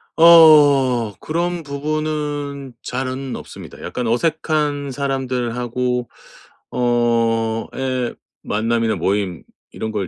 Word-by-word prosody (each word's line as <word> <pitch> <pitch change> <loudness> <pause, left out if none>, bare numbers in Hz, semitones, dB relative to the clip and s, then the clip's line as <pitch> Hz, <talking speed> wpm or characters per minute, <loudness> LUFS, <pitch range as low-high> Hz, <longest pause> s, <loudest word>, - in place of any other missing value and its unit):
어 145 -8 +6
그런 175 +2 -2
부분은 145 -2 -3
잘은 130 +1 -4
없습니다. - - -10
약간 125 -2 -3
어색한 150 +2 0
사람들하고 125 -2 -2 0.6
어 115 -2 +1
예 130 -2 -2 0.3
만남이나 115 +1 0
모임 95 -3 -1 0.3
이런 110 - -5
걸 100 -4 -2
130 Hz, 195 characters per minute, -20 LUFS, 115-145 Hz, 0.6 s, 어